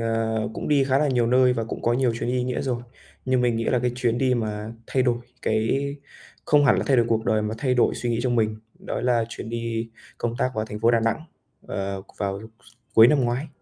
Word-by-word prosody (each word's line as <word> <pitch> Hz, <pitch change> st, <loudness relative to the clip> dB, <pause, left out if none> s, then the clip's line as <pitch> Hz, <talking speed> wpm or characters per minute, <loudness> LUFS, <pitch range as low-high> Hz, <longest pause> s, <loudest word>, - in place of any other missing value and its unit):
ờ, 115 Hz, -1 st, -1 dB
cũng -, -, -4 dB
đi 145 Hz, -2 st, +4 dB
khá 135 Hz, 0 st, +2 dB
là 150 Hz, -, +2 dB
nhiều 125 Hz, -3 st, +2 dB
nơi 125 Hz, +1 st, +4 dB
và 115 Hz, -2 st, -2 dB
cũng -, -, -6 dB
có 120 Hz, -, +2 dB
nhiều 125 Hz, -1 st, +2 dB
chuyến 120 Hz, -, -3 dB
đi 130 Hz, -, 0 dB
ý 125 Hz, -, 0 dB
nghĩa 125 Hz, -1 st, -2 dB
rồi. 125 Hz, -3 st, -2 dB, 0.4 s
Nhưng 130 Hz, -1 st, +2 dB
mình 120 Hz, -2 st, +2 dB
nghĩ 115 Hz, -, -1 dB
là 125 Hz, -, +2 dB
cái 125 Hz, 0 st, 0 dB
chuyến 120 Hz, -2 st, 0 dB
đi 130 Hz, -1 st, +2 dB
mà 110 Hz, -1 st, -3 dB
thay 130 Hz, -, +1 dB
đổi 120 Hz, -2 st, +1 dB, 0.2 s
cái 110 Hz, 0 st, +1 dB, 0.8 s
không 145 Hz, -1 st, +4 dB
hẳn 130 Hz, -, +5 dB
là -, -, -1 dB
thay 135 Hz, -, +4 dB
đổi 120 Hz, -2 st, +3 dB
cuộc 110 Hz, -1 st, +1 dB
đời 110 Hz, -1 st, +2 dB
mà 105 Hz, +1 st, -2 dB
thay 130 Hz, 0 st, +1 dB
đổi 120 Hz, -, +3 dB
suy 120 Hz, -, -2 dB
nghĩ 115 Hz, -, 0 dB
trong 120 Hz, -2 st, +1 dB
mình, 110 Hz, -1 st, +1 dB, 0.2 s
đó -, -, -4 dB
là 120 Hz, -2 st, +2 dB
chuyến 115 Hz, -, -7 dB
đi 115 Hz, -1 st, -3 dB, 0.3 s
công 120 Hz, 0 st, -2 dB
tác 130 Hz, -, +1 dB
vào 110 Hz, -, -1 dB
thành 105 Hz, -1 st, -7 dB
phố 115 Hz, -, +4 dB
Đà 115 Hz, -1 st, +3 dB
Nẵng, 115 Hz, +7 st, 0 dB, 0.4 s
ờ, 95 Hz, 0 st, -4 dB, 0.2 s
vào 100 Hz, -1 st, -2 dB, 0.2 s
s 110 Hz, -, -20 dB, 0.2 s
cuối 110 Hz, -, +9 dB
năm 150 Hz, 0 st, +3 dB
ngoái. 120 Hz, +5 st, -1 dB
120 Hz, 255 wpm, -24 LUFS, 110-125 Hz, 0.8 s, cuối